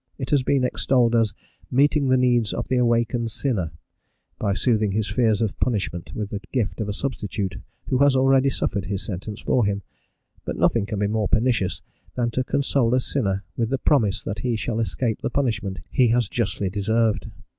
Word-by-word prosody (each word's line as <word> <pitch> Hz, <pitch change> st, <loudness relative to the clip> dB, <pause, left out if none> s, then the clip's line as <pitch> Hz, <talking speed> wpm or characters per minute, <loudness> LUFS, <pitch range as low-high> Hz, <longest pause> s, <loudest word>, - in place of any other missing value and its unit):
It 130 Hz, -3 st, -5 dB
has 145 Hz, -2 st, +4 dB
been 130 Hz, +1 st, +1 dB
extolled 125 Hz, -1 st, +2 dB
as 110 Hz, -3 st, +2 dB, 0.3 s
"meeting 140 Hz, +2 st, +3 dB
the 130 Hz, 0 st, +4 dB
needs 120 Hz, -4 st, +2 dB
of -, -, -3 dB
the 130 Hz, -, +2 dB
awakened 120 Hz, -1 st, +1 dB
sinner" 110 Hz, -, -1 dB, 0.7 s
by 100 Hz, -2 st, 0 dB
soothing 110 Hz, -4 st, +1 dB
his 105 Hz, 0 st, 0 dB
fears 115 Hz, -3 st, +2 dB
of 105 Hz, -, -3 dB
punishment 100 Hz, -7 st, -2 dB
with 105 Hz, -2 st, -4 dB
the 100 Hz, -, -3 dB
gift 115 Hz, -3 st, -1 dB
of 105 Hz, -, -2 dB
a -, -, 0 dB
substitute 105 Hz, -5 st, -3 dB, 0.3 s
who 130 Hz, -, 0 dB
has 140 Hz, -1 st, +5 dB
already 135 Hz, +1 st, +4 dB
suffered 100 Hz, -6 st, -2 dB
his 100 Hz, +1 st, -3 dB
sentence 105 Hz, +2 st, -5 dB
for 125 Hz, -, +2 dB
him; 100 Hz, -1 st, -1 dB, 0.6 s
but -, -, -4 dB
nothing 110 Hz, -4 st, +2 dB
can 105 Hz, -, -3 dB
be 100 Hz, -, +1 dB
more 105 Hz, 0 st, 0 dB
pernicious 110 Hz, -4 st, +1 dB, 0.3 s
than 120 Hz, -1 st, 0 dB
to 130 Hz, -, 0 dB
console 135 Hz, -3 st, +1 dB
a -, -, +3 dB
sinner 100 Hz, -5 st, -1 dB
with 115 Hz, -2 st, -1 dB
the 135 Hz, -, 0 dB
promise 110 Hz, -8 st, +2 dB
that 100 Hz, -, -4 dB
he 125 Hz, -2 st, -1 dB
shall 110 Hz, +2 st, -2 dB
escape 115 Hz, 0 st, -1 dB
the -, -, -1 dB
punishment 110 Hz, -8 st, -1 dB
he 125 Hz, -, +4 dB
has 120 Hz, -1 st, +2 dB
justly 100 Hz, -4 st, -1 dB
deserved. 110 Hz, +2 st, +1 dB
115 Hz, 190 wpm, -23 LUFS, 105-125 Hz, 0.7 s, has